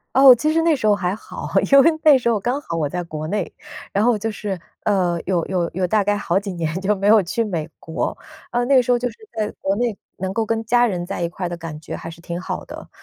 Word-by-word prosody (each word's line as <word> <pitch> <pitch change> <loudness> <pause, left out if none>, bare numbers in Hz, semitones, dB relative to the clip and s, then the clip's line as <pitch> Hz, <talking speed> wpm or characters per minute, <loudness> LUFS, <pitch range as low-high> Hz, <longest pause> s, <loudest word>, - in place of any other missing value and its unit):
哦， 265 -1 +9
其 305 +6 0
实 325 +1 +2
那 325 -1 +3
时 215 -6 -1
候 210 - +5
还 185 -1 -1
好， - - -8 0.2
因 275 - +9
为 330 +2 +5
那 295 -4 +7
时 235 - 0
候 225 -3 +2
刚 245 +7 -1
好 165 - -5
我 150 -3 0
在 180 +3 -3
国 155 -2 -6
内， 200 +1 -2 0.4
然 200 - +2
后 240 -2 +3
就 220 +2 -3
是， 200 -3 -4 0.2
呃， 180 -4 +1
有 175 -3 0
有 180 -3 -1
有 185 +1 0
大 205 +3 +2
概 205 +1 +1
好 190 -2 +1
几 200 0 -5
年 160 -3 -2
就 210 +2 +1
没 195 +1 -1
有 215 0 +7
去 195 +6 -1
美 170 -7 -3
国。 160 - -3 0.3
呃， 240 0 +1
那 275 +2 +3
个 255 - +7
时 250 - 0
候 245 - +4
就 245 +1 -2
是 225 - -13 0.2
在 210 -1 -1
国 195 +1 0
内 235 0 0 0.2
能 190 +1 -3
够 225 +2 0
跟 225 0 -1
家 240 +2 +4
人 175 -4 -3
在 - - -5
一 170 - 0
块 180 +1 -4
的 175 - -4
感 160 -2 -7
觉 155 - -7
还 - - -7
是 165 0 -11
挺 170 0 -5
好 - - -5
的。 - - -10
205 Hz, 295 characters per minute, -21 LUFS, 175-235 Hz, 0.4 s, 哦